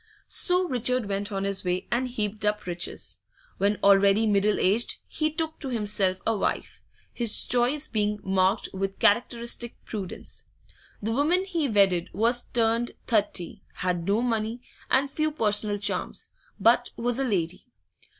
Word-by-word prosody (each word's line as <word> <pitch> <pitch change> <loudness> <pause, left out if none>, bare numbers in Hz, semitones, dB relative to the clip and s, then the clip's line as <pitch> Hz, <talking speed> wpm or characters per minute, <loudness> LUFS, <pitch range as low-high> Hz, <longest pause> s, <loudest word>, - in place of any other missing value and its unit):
So 360 0 +2
Richard 250 -2 +1
went 200 +1 -3
on 195 -1 -2
his 200 -1 +1
way 180 0 -1
and 250 +2 +1
heaped 215 -4 -2
up 210 0 0
riches. 175 -1 -5 0.4
When 200 +1 +2
already 200 +2 +5
middle 210 0 +2
aged 210 +6 +2
he 310 0 -1
took 320 0 -3
to 275 - -4
himself 205 -5 0
a 225 - +2
wife, 200 - -2 0.3
his 235 -3 +3
choice 250 +5 +2
being 210 -1 -1
marked 190 0 +2
with 195 0 -3
characteristic 235 +1 +1
prudence. 200 -5 -6 0.6
The 220 - -1
woman 330 +9 +2
he 335 -7 -1
wedded 195 -5 +3
was 235 +3 +1
turned 230 0 +1
thirty, 205 -5 -1
had 175 -2 -2
no 210 +4 +2
money, 225 0 -1 0.3
and 270 +2 +3
few 310 +3 -1
personal 210 -6 0
charms, 205 - -2 0.3
but - - +4
was 245 +2 0
a - - +1
lady. 185 -5 -2
215 Hz, 150 wpm, -26 LUFS, 200-245 Hz, 0.6 s, already